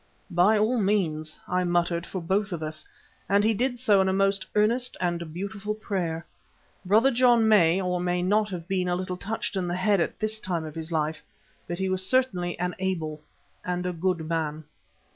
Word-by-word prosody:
"By 180 +5 +4
all 225 +4 +2
means," 165 -7 0
I 180 0 +1
muttered 175 -1 0
for 185 -3 -5
both 195 +4 0
of 165 -3 -4
us, 155 0 -4 0.5
and 200 +1 +4
he 220 +1 +3
did 245 +3 0
so 210 -5 +4
in 190 - +2
a - - +1
most 195 0 +1
earnest 235 +4 +2
and 170 -2 -2
beautiful 200 +4 -4
prayer. 175 -6 -3 0.6
Brother 220 +8 +4
John 240 -2 +4
may 185 -5 +5
or 180 -1 -1
may 180 0 0
not 210 +3 +2
have 175 -3 -6
been 185 -2 0
a 175 - +1
little 185 0 -3
touched 210 +3 -4
in 185 -2 -1
the 175 - -1
head 195 0 +2
at - - -2
this 215 0 -1
time 175 -5 -3
of 155 - -7
his 160 +1 -5
life, 155 -1 -1 0.5
but 175 - -3
he 190 +1 -1
was 185 0 0
certainly 185 -7 +1
an 180 +1 -2
able 160 -5 -2 0.4
and 180 0 -2
a 180 - -1
good 170 -1 -1
man. 155 -2 -2
185 Hz, 200 wpm, -26 LUFS, 170-210 Hz, 0.6 s, may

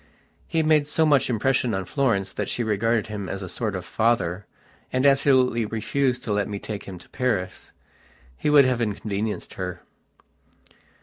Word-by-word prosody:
He 160 -1 +1
made 155 -2 +3
so 160 +2 +2
much 140 -4 +3
impression 125 0 +1
on 95 -1 -3
Florence 100 -3 0
that 105 - -3
she 120 - -1
regarded 110 +1 +1
him 105 -3 -5
as 95 0 -4
a - - -5
sort 105 +3 -3
of 90 -1 -5
father, 105 -5 0 0.4
and 130 +2 +1
absolutely 130 -4 +4
refused 125 +4 -1
to 110 - -1
let 100 -1 0
me 100 - -3
take 105 0 -6
him 95 -2 -8
to - - -16
Paris. 110 -8 -2 0.6
He 150 - -1
would 145 -2 +7
have 125 -2 +1
inconvenienced 105 0 -3
her. 90 -1 -5
110 Hz, 170 wpm, -24 LUFS, 100-130 Hz, 0.6 s, would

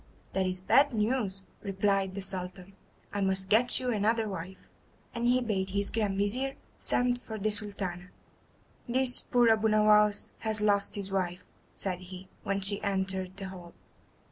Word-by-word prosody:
"That 190 0 +1
is 185 0 -1
bad 275 +8 +4
news," 210 -3 0 0.2
replied 195 -1 0
the 200 - -4
Sultan; 185 0 -4 0.4
"I 205 - -2
must 190 0 +1
get 240 +4 +4
you 250 -1 -1
another 220 +1 +1
wife." 190 -1 -6 0.6
And 235 0 -1
he 250 +1 +3
bade 195 -5 -1
his 200 +1 0
Grand 210 -4 -1
Vizir 250 +7 0 0.2
send 245 0 0
for 220 -2 -7
the 215 +1 -1
Sultana. 195 -4 -2 0.8
"This 255 0 +3
poor 240 -1 +3
Abu 220 0 +3
Nowas 210 -1 +3
has 220 -1 0
lost 205 0 +2
his 200 -1 -3
wife," 180 -2 -2 0.3
said 185 -2 -3
he, 185 +1 -11
when 195 0 -2
she 200 +1 +5
entered 190 -2 -2
the 195 -1 -5
hall. 175 -2 -11
200 Hz, 160 wpm, -29 LUFS, 190-220 Hz, 0.8 s, she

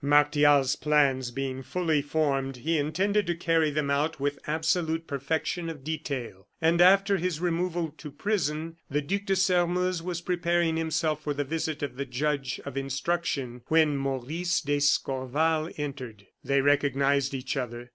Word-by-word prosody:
Martial's 145 -1 +4
plans 140 -4 +2
being 130 +1 -4
fully 160 0 0
formed, 140 -3 0
he 155 +5 0
intended 190 +7 +1
to 175 - 0
carry 165 -2 +2
them 145 -1 -1
out 150 +2 0
with 145 +1 -1
absolute 160 +1 0
perfection 160 +4 -2
of 150 -5 -8
detail, 135 -10 -5
and, 170 +1 +3
after 195 +2 +5
his 180 -3 -2
removal 175 -1 -1
to 150 - -7
prison, 165 -1 -2
the 145 +1 0
Duc 200 +6 -2
de 195 - +1
Sairmeuse 180 -1 +1
was 175 -1 -4
preparing 170 -2 +1
himself 160 -1 0
for 145 -1 -2
the 145 - 0
visit 155 +1 -3
of 140 -3 -4
the 140 - -2
judge 135 +1 -2
of 140 -1 -6
instruction, 135 -2 -2
when 155 -2 +3
Maurice 140 +6 -1
d'Escorval 145 +2 +1
entered. 130 -8 -6 0.2
They 140 0 +2
recognized 140 -1 +2
each 130 +2 -3
other. 120 -2 -5
150 Hz, 150 wpm, -27 LUFS, 140-165 Hz, 0.2 s, after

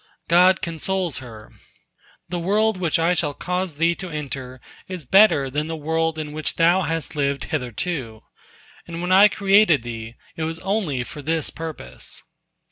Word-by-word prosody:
God 180 +2 +5
consoles 170 0 -1
her: 115 -4 -11 0.8
"The 175 0 -3
world 210 +5 +2
which 170 -4 +1
I 165 +2 +2
shall 150 -5 -1
cause 180 -2 -2
thee 165 +3 +2
to 185 - -5
enter 135 -4 -6 0.3
is 185 -5 -7
better 190 -4 +5
than 150 +3 -2
the 165 - -3
world 160 +1 -1
in 155 -1 -4
which 155 +1 -2
thou 170 +3 +4
hast 165 -2 -3
lived 140 -1 0
hitherto, 125 -3 -3 0.7
and 165 0 -6
when 180 - -2
I 195 +3 +8
created 195 - +4
thee, 115 -1 -7 0.2
it 160 - -3
was 160 +1 -3
only 180 - -1
for 145 +4 -8
this 160 +1 -1
purpose." 155 - -5
165 Hz, 160 wpm, -22 LUFS, 140-180 Hz, 0.8 s, I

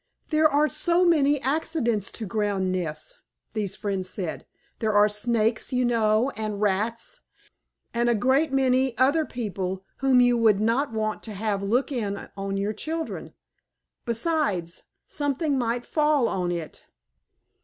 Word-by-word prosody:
"There 310 0 +4
are 295 +1 +3
so 340 +4 +2
many 290 -4 +4
accidents 265 - 0
to 225 - -5
ground 200 -3 -1
nests," 155 -4 -4 0.3
these 205 -3 -2
friends 195 -3 -3
said. 180 -5 -5 0.3
"There 220 -1 0
are 205 0 +6
Snakes, 220 +1 0
you 250 -1 +1
know, 230 +1 +2
and 215 -3 -4
Rats, 220 - -1 0.7
and 240 0 +1
a 235 - +3
great 265 +7 +2
many 260 -2 +2
other 285 +5 +3
people 190 -5 -4
whom 270 -2 +4
you 245 -1 +4
would 215 -3 +4
not 230 +5 +1
want 215 -1 -2
to - - -6
have 205 0 -2
look 235 +9 0
in 205 -6 -3
on 195 0 -3
your 200 +2 -1
children. 320 +9 -5 0.7
Besides, 230 - -1 0.2
something 290 +1 -1
might 240 0 -1
fall 300 -5 +2
on 180 -2 -1
it." 170 -3 -6
230 Hz, 145 wpm, -25 LUFS, 205-270 Hz, 0.7 s, are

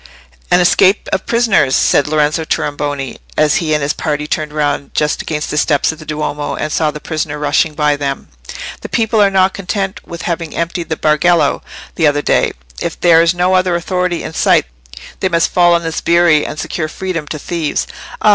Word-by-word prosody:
"An 180 - +4
escape 185 +3 +3
of 190 - -1
prisoners," 225 - +2
said 145 - +3
Lorenzo 155 +1 +1
Tornabuoni, 145 -3 -3 0.2
as 150 -1 +3
he 155 -3 0
and 150 - -1
his 145 - 0
party 150 -2 -2
turned 150 0 -2
round 145 -2 -2
just 150 -1 0
against 150 -1 -4
the 150 - +1
steps 145 -1 +2
of 160 - -11
the 155 - -12
Duomo, 150 -1 -3
and 155 - -3
saw 155 - +1
a 150 - -6
prisoner 150 -1 -3
rushing 150 +1 +1
by 150 -1 +2
them. 140 -1 -4 0.5
"The - - -7
people 225 -1 +1
are 200 - +5
not 190 0 +2
content 195 0 -3
with 170 0 -8
having 165 -2 -3
emptied 170 0 -3
the 160 - -2
Bargello 160 +3 +2 0.3
the 160 - +2
other 145 0 +1
day. - - +2 0.3
If - - -4
there 165 -2 +5
is 165 +1 +2
no 180 +1 +1
other 185 -1 +2
authority 180 0 -1
in - - -6
sight - - +3 0.5
they 190 - 0
must 170 -2 +1
fall 175 -1 +5
on 170 - 0
the 165 - -2
sbirri 170 -2 +3
and 150 - -6
secure 155 -3 -3
freedom 165 -2 -4
to 155 - -5
thieves. 160 0 -2 0.4
Ah! 215 - +5
160 Hz, 200 wpm, -15 LUFS, 150-175 Hz, 0.5 s, are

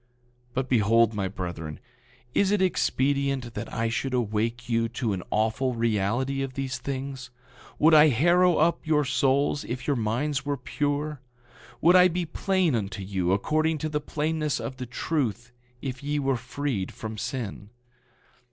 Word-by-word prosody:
9:47 120 - -41 0.5
But 130 0 0
behold, 115 -1 +4
my 100 -2 -1
brethren, 85 -5 -6 0.5
is 200 - +3
it 205 0 +2
expedient 140 -7 +1
that 110 +1 -6
I 115 0 -1
should 125 +3 -1
awake 115 +1 -1
you 115 -1 +1
to 115 -2 -2
an 95 - -3
awful 115 +4 0
reality 115 +4 0
of 135 -1 -4
these 130 -2 -3
things? 135 0 -5 0.5
Would 160 +2 +5
I 155 0 +8
harrow 175 +7 +4
up 165 +2 +3
your 150 -2 +3
souls 140 +2 +1
if 125 +2 -5
your 145 - +1
minds 130 +5 -1
were 145 0 -2
pure? 145 +3 -2 0.6
Would 175 +3 +6
I 180 0 +8
be 180 0 -2
plain 185 -1 +1
unto 100 -4 -2
you 95 -2 -1
according 155 +11 +1
to 155 +1 -3
the 150 -1 -1
plainness 155 -2 -1
of 120 +3 -5
the 125 -2 -6
truth 120 -3 -2 0.3
if 130 -1 -4
ye 145 +1 -1
were 135 -2 +1
freed 125 -4 -3
from 110 -1 -7
sin? 110 -7 -5
130 Hz, 160 wpm, -26 LUFS, 115-150 Hz, 0.6 s, I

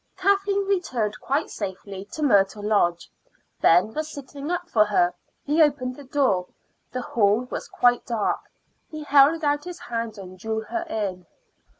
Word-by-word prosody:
Kathleen 395 +1 +2
returned 255 - -1
quite 285 +4 -1
safely 195 -1 -6
to 305 +9 -6
Myrtle 205 -5 +3
Lodge. 175 -5 +1 0.5
Ben 180 +6 +4
was 310 0 -3
sitting 285 +1 -7
up 355 0 -2
for 220 -10 +4
her; 180 -4 +2 0.3
he 300 +3 +2
opened 275 -4 +2
the 285 - -11
door. 255 -10 +1 0.4
The 255 -1 -3
hall 210 0 +2
was - - -4
quite 245 -1 +2
dark. 225 -4 0 0.5
He 310 -1 -7
held 290 +3 +5
out 290 0 +1
his 360 -1 -7
hand 230 -2 -4
and 185 -1 -10
drew 220 +2 -2
her 340 +10 -4
in. 190 - -3
245 Hz, 160 wpm, -24 LUFS, 205-300 Hz, 0.5 s, held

